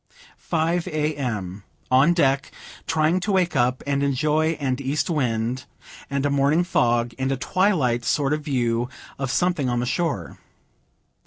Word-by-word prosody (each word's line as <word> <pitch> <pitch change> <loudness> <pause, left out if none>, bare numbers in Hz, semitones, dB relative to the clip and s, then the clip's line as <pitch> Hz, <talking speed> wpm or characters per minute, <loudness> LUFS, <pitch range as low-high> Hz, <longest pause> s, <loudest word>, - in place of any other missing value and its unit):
Five, 165 +1 0
A. 155 0 -1
M. 105 -8 -4 0.3
On 135 +6 +5
deck, 140 -5 +1 0.4
trying 160 +2 +2
to 195 +3 -2
wake 185 -2 +1
up 125 +1 +1
and 140 -1 0
enjoy 155 +3 +1
an 135 -4 -2
east 140 +5 -1
wind 125 -3 -1 0.4
and 140 0 -1
a 145 - +1
morning 140 +5 +3
fog, 120 -8 +1
and 130 +1 0
a 135 - 0
twilight 135 - +1
sort 140 +3 +1
of 155 - -1
view 120 -4 0 0.3
of 135 -2 -2
something 150 -1 +1
on 120 0 0
the 120 - -1
shore. 140 - -2
140 Hz, 155 wpm, -23 LUFS, 125-155 Hz, 0.4 s, On